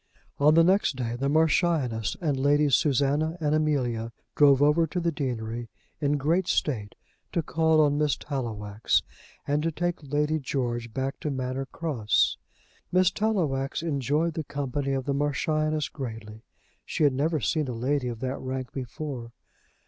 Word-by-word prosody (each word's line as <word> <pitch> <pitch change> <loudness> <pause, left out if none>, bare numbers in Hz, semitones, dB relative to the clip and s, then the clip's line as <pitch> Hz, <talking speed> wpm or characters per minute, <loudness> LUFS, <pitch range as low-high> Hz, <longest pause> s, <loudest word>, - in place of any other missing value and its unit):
On 150 +2 +5
the 165 - +7
next 185 -4 +3
day 120 -2 -3
the 135 +3 -1
Marchioness 155 - +1
and 155 -6 0
Ladies 145 +1 +2
Susannah 145 +5 +2
and 150 -2 +1
Amelia 125 -7 0 0.2
drove 140 -2 +6
over 150 +3 +4
to 180 - -3
the 170 -1 0
deanery 120 -5 -4 0.3
in 145 0 +1
great 165 +6 +1
state, 110 -9 -1 0.4
to 170 - 0
call 160 0 +2
on 145 -1 +2
Miss 150 -2 +1
Tallowax, 110 -7 -1 0.4
and 145 +1 +1
to 165 +1 0
take 175 +2 -2
Lady 150 +2 0
George 120 -4 -2
back 135 +3 -3
to 150 - -3
Manor 130 0 -3
Cross. 130 -12 +1 0.5
Miss 185 0 +4
Tallowax 165 -11 -1
enjoyed 150 +2 0
the 160 - -3
company 140 -1 -2
of 135 -1 -2
the 140 - 0
Marchioness 155 +2 0
greatly. 110 -5 -7 0.4
She - - -2
had 145 -2 +4
never 155 +4 0
seen 150 +3 0
a 125 - -3
lady 130 +3 -1
of 120 -1 -5
that 130 +1 -2
rank 130 -1 -4
before. 130 -2 -6
140 Hz, 155 wpm, -27 LUFS, 130-155 Hz, 0.5 s, the